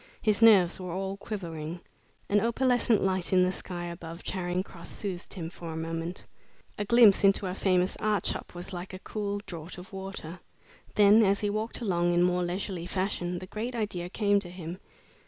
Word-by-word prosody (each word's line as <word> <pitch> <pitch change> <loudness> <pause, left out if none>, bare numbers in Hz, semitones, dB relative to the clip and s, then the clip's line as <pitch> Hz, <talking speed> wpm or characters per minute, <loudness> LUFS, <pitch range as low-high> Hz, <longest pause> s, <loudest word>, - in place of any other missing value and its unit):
His 215 0 +1
nerves 195 -7 +6
were 180 -2 -5
all 190 +1 -2
quivering. 170 -6 -5 0.5
An 205 0 +3
opalescent 235 -1 +2
light 190 -2 0
in 185 -1 +5
the 180 - +2
sky 175 -2 -3
above 170 0 -7
Charing 180 -1 -2
Cross 170 -3 -10
soothed 190 -3 -5
him 170 -4 -4
for 170 -2 -7
a 160 - -5
moment. 165 +2 -4 0.5
A 205 - 0
glimpse 225 -3 +6
into 195 0 +4
a 180 - -2
famous 185 -1 +1
art 210 -4 0
shop - - -3
was 175 +2 -6
like 180 +1 -6
a 185 - -12
cool 205 -1 -3
draught 170 0 -8
of 180 +2 -11
water. 190 -3 -7 0.6
Then, 210 +1 +7
as 200 -1 +3
he 205 -1 0
walked 220 +4 -3
along 175 -5 +1
in 175 - +4
more 180 0 +2
leisurely 175 0 -3
fashion, 180 -2 -1
the 185 - -6
great 225 +6 -4
idea 190 -6 -2
came 205 0 +2
to 185 -3 -5
him. 175 0 -7
185 Hz, 190 wpm, -29 LUFS, 175-205 Hz, 0.6 s, Then